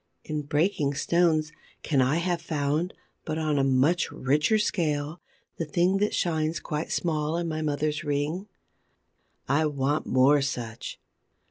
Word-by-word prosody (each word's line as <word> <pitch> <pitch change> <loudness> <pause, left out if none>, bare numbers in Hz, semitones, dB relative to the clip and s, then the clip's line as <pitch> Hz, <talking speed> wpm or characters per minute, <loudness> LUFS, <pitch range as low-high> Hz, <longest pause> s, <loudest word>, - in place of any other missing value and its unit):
In 150 -1 -3
breaking 145 0 0
stones, 160 -1 +2 0.3
can 140 -4 +2
I 130 +4 +2
have 170 0 0
found, 155 +1 -1 0.3
but 155 -1 -3
on 155 -2 +1
a - - +3
much 135 +6 +2
richer 150 - +2
scale, 155 -6 -1 0.4
the 165 - -2
thing 175 +5 +2
that 210 +1 +1
shines 160 -1 0
quite 150 0 -4
small 155 -1 0
in 170 0 -2
my 155 -1 -2
mother's 150 0 -1
ring? 150 +6 -2 1.0
I 155 +3 +2
want 145 +1 -1
more 135 +3 +5
such. 120 -4 -4
155 Hz, 140 wpm, -27 LUFS, 145-170 Hz, 1.0 s, more